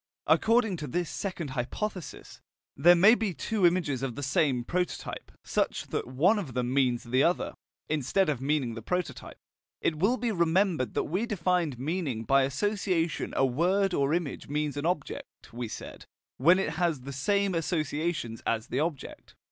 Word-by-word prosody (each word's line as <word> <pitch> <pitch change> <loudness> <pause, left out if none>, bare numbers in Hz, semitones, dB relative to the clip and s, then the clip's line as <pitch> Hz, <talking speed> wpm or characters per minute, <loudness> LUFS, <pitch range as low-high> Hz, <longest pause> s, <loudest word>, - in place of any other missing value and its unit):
According 225 -4 +3
to 150 - -5
this 175 +5 -2
second 180 -7 -4
hypothesis, 170 - -5 0.3
there 175 +1 +6
may 200 +6 +7
be 220 -7 -1
two 210 -6 +2
images 165 -7 0
of 130 -4 -3
the 145 - -5
same 135 -2 +1
prototype, 180 +7 -3
such - - -1
that - - -2
one 170 - +3
of 140 - -6
them 125 0 -1
means 125 -3 +2
the 125 +2 +1
other, 175 +4 +1 0.3
instead 155 +6 +1
of 145 -5 -1
meaning 135 -4 0
the 115 - -7
prototype. 180 +8 -4 0.4
It 155 -2 -1
will 220 +9 +3
be 235 -1 -1
remembered 170 - +1
that - - +1
we 190 +9 -2
defined 180 - 0
meaning 140 -4 -2
by 135 +4 +4
association 180 +1 -1
a 135 - +4
word 180 +9 +1
or 140 -2 +1
image 170 -6 -4
means 150 0 -2
an 145 +3 -1
object, 175 -9 -5
we 120 0 -4
said, - - -9 0.3
when 170 +8 +5
it 190 -5 -1
has 165 -6 +1
the 140 +2 -7
same 200 +8 +1
associations 155 -6 -2
as 115 +1 -1
the 130 - -1
object. 155 -2 -4
160 Hz, 170 wpm, -28 LUFS, 135-185 Hz, 0.4 s, may